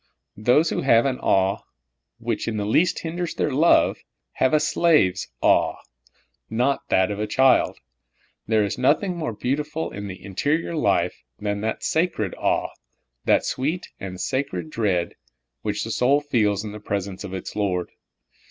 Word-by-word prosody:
Those 125 +9 +3
who - - -1
have 120 -3 +4
an 130 -2 -1
awe 95 +1 +2 0.6
which 115 -1 -3
in 110 -2 -2
the 105 - -1
least 165 - +2
hinders 170 +1 -3
their 150 - 0
love, 155 +6 +4 0.3
have 130 - +1
a 155 - +4
slave's 150 - +2 0.2
aw^e, - - +3 0.7
and 110 - -5
not 135 +3 +2
that 95 +2 +3
of 100 - -4
a 105 - -1
child. 130 +2 +3 0.7
There 110 -1 +3
is 100 +4 -3
nothing 160 +8 +2
more 160 -6 -3
beautiful 150 +8 -2
in 100 0 -6
the 95 -1 -8
interior 145 - -1
life 155 - +1 0.2
than 100 -1 -2
that 110 +1 -3
sacred 160 - 0
awe, - - 0 0.5
that - - +3
sweet 155 +8 -2
and 95 -1 -7
sacred 95 - -2
dread, 95 -6 0 0.5
which - - -2
the - - -4
soul 135 +4 +3
feels 110 -9 +1
in 105 - -6
the 105 - -8
presence 100 -2 -4
of 95 -2 -6
its 95 - -7
Lord. 95 -4 -1
115 Hz, 160 wpm, -23 LUFS, 100-145 Hz, 0.7 s, have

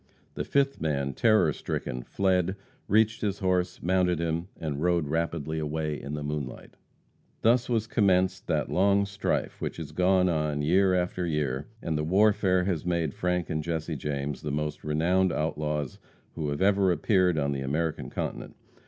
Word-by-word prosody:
The - - -3
fifth 140 0 +1
man, 70 -3 -1
terror 110 - +3
stricken, 60 0 -4
fled, 95 +3 +1 0.3
reached 110 +1 +3
his 100 -2 -1
horse, 90 -1 0
mounted 90 0 +2
him, 85 +1 -1
and 75 -3 -3
rode 85 -3 +2
rapidly 80 -1 -1
away 75 0 -2
in 70 +2 -5
the 75 - -4
moonlight. 75 -3 -5 0.7
Thus 120 +2 +3
was 115 -3 +1
commenced 95 -4 +2
that - - 0
long 100 +2 +3
strife 100 -1 -2
which - - -3
has - - -6
gone 90 0 +3
on 75 -3 0
year 95 +4 +4
after 90 0 -1
year, 75 -3 -1 0.2
and 80 -2 -1
the - - -1
warfare 95 +1 +3
has 90 -5 -1
made 85 -4 0
Frank 90 -1 -1
and 80 -1 -1
Jesse 80 0 -3
James 70 0 -3
the 75 - -4
most 75 +1 -3
renowned 85 +5 +2
outlaws 75 -3 -2 0.3
who 75 -3 -3
have 70 +5 -1
ever 100 -1 +4
appeared 90 -2 +2
on 70 -1 +1
the 70 -1 -2
American 75 +4 -2
continent. - - -5
85 Hz, 165 wpm, -28 LUFS, 75-95 Hz, 0.7 s, year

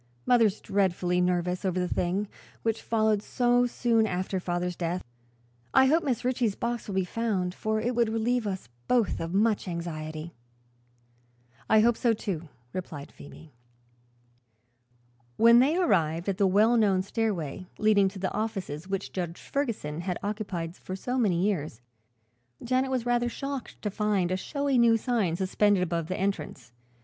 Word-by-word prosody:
Mother's 225 -4 +4
dreadfully 180 -2 +1
nervous 180 0 0
over 185 -1 0
the 180 - 0
thing, 185 +4 -1 0.4
which 225 -1 0
followed 220 -2 +1
so 245 +1 +2
soon 230 -2 +2
after 185 0 -2
father's 180 0 -2
death. 175 +1 -2 0.7
I 265 - +7
hope 315 +5 +4
Mrs. 260 -7 -1
Ritchie's 245 -4 0
box 235 -1 -3
will 200 - -4
be 190 -1 +1
found, 190 -3 -1
for 220 +2 -1
it 240 +3 -1
would 235 -2 +2
relieve 225 +1 0
us 190 - -4 0.2
both 240 -4 +2
of 165 0 -4
much 210 0 +2
anxiety." 160 -2 -5 1.4
"I 220 0 +6
hope 235 +1 +4
so, 235 -3 +2
too," 175 -7 -4 0.2
replied 155 -6 -6
Phoebe. 150 +1 -14 1.8
When 235 +1 +7
they 290 +7 +3
arrived 165 - +1
at 195 -2 -1
the 200 - +4
well 215 +5 +4
known 195 -4 +3
stairway 190 -6 -2
leading 210 -2 +4
to 195 - -11
the 190 0 -2
offices 190 -7 -3
which 195 -1 -3
Judge 175 -2 -4
Ferguson 215 - -3
had 180 0 -2
occupied 200 -5 -3
for 185 - -7
so 250 +6 -2
many 185 -7 +2
years, 155 - -1 0.8
Janet 255 +2 +1
was 255 -3 -1
rather 240 0 +1
shocked 275 +1 -6
to 210 - -1
find 200 -4 0
a - - +2
showy 280 +6 0
new 230 -1 +5
sign 220 -8 0
suspended 190 +1 +2
above 170 -2 -2
the 185 - -3
entrance. 190 -10 -3
200 Hz, 160 wpm, -28 LUFS, 180-230 Hz, 1.8 s, I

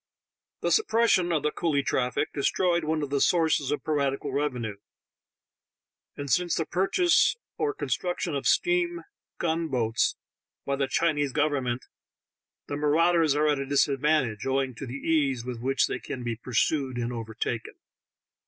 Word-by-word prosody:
The - - 0
suppression 230 - +3
of 155 -4 0
the 150 - +1
coolie 145 -5 0
traffic 125 -1 0
destroyed 170 +4 +1
one 155 0 0
of 140 - -5
the 140 -1 +1
sources 160 -5 +2
of 150 - -2
piratical 140 -2 -1
revenue, 125 -7 -2 1.4
and 145 - -5
since 180 +3 +2
the 165 - -1
purchase 195 - +3 0.2
or 430 -1 0
construction 180 - -2
of 140 - -1
steam 350 -1 +1 0.3
gun 165 0 -1
boats 115 -5 0 0.5
by 140 - 0
the 135 -1 0
Chinese 145 -3 +1
government 135 -5 0 0.8
the 145 - -4
marau 155 +4 +3
ders 160 -4 +3
are 150 +1 +2
at 145 -2 +2
a 140 - -2
disadvantage, 140 -4 +1
owing 135 -1 0
to 130 +3 -7
the 125 - -6
ease 140 -5 0
with 125 -2 -5
which 135 +2 +2
they - - -3
can 125 - -6
be 120 -1 -2
pursued 130 +3 0
and 120 0 -2
overtaken. 115 0 -4
145 Hz, 155 wpm, -27 LUFS, 130-165 Hz, 1.4 s, suppression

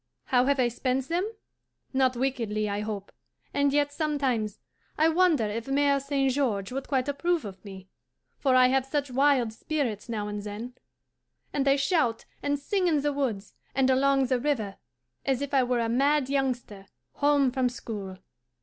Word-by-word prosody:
How 250 -1 +3
have 280 0 +2
I 250 - +4
spent 255 +2 -1
them? 360 +6 0 0.6
Not 260 -1 +2
wickedly, 230 -5 -1
I 205 0 -2
hope, 210 -2 -5 0.4
and 285 0 +2
yet 290 0 +1
sometimes 270 -9 -1 0.4
I 315 +1 +4
wonder 325 -7 +3
if 220 +3 -4
Mere 280 0 +3
St. 275 -1 0
George 225 -8 -1
would 270 +1 -4
quite 265 -2 0
approve 325 +1 0
of 195 -2 -9
me; 190 -2 -10 0.5
for 265 -2 +3
I 255 0 +6
have 265 0 +2
such 280 0 -2
wild 260 -3 +3
spirits 245 -4 -3
now 210 -3 -2
and 205 0 -4
then, 210 +4 -6 0.8
and 280 -1 0
I 275 - +5
shout 275 -5 +1 0.2
and 285 0 0
sing 365 +6 0
in 305 -4 +2
the 290 0 0
woods 230 -8 -2 0.2
and 265 0 +3
along 270 +1 +3
the 255 0 +1
river 235 -8 -1 0.5
as 270 -2 +1
if 285 0 -4
I 270 - +5
were 250 -1 +1
a 230 - 0
mad 275 +3 +2
youngster 245 -8 -2 0.3
home 285 -2 +3
from 255 -1 +1
school. 205 -6 -7
265 Hz, 175 wpm, -27 LUFS, 230-285 Hz, 0.8 s, I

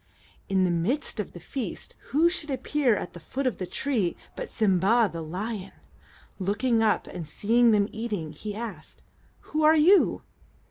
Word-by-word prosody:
In 190 -1 +3
the 180 - +2
midst 220 - -1
of 210 - -4
the 175 - -9
feast, 250 - -5 0.2
who 310 +5 +4
should 340 -3 -1
appear 265 -2 +1
at 180 - -5
the 175 - -9
foot 265 - -4
of 255 - -1
the 185 - -3
tree 225 -10 -1 0.2
but - - -5
Sim'ba, 215 +2 +3
the 165 - -5
lion? 195 +5 -5 0.7
Looking 215 +5 +1
up, 215 -2 +2
and 165 -3 -7
seeing 230 +9 +3
them 205 -2 +3
eating, 210 -8 -4
he 205 +7 -6
asked, 210 -8 -7 0.5
"Who 310 - 0
are 310 +1 +6
you?" 360 +6 +5
220 Hz, 170 wpm, -27 LUFS, 185-260 Hz, 0.7 s, are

